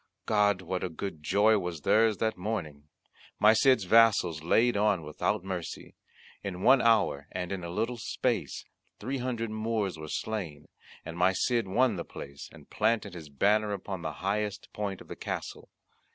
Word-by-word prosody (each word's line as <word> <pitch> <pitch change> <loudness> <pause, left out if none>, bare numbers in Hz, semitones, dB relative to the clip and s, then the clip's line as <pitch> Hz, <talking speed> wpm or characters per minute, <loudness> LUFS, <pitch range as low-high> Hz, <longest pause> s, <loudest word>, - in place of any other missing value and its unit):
God! 105 -3 +2
what 90 +1 -3
a 90 - -2
good 80 -1 -6
joy 105 +7 +3
was 90 -4 -5
theirs 110 +5 +3
that 110 -1 0
morning! 90 -8 -4 0.5
My 105 +1 +6
Cid's 130 0 +4
vassals 100 -6 +4
laid 115 +8 +3
on 100 -4 +2
without 75 +3 -2
mercy; 95 -3 -6 0.5
in 95 -2 -5
one 135 -1 +6
hour, 105 -11 +2
and 90 0 -4
in 95 -2 -4
a 85 - -5
little 115 +7 -2
space, 115 - -2 0.3
three 130 +5 -3
hundred 120 -3 -3
Moors 110 -5 -2
were 80 - -7
slain, 80 -6 -4 0.4
and 85 +1 -7
my 90 +2 +4
Cid 115 +2 0
won 115 +2 +2
the 85 - -3
place, 70 0 -10
and - - -15
planted 110 -4 0
his 80 -4 -9
banner 105 +8 +2
upon 95 -2 -5
the 80 -2 -4
highest 105 +1 -2
point 100 -3 -4
of - - -13
the - - -7
castle. - - -6
100 Hz, 170 wpm, -29 LUFS, 85-110 Hz, 0.5 s, My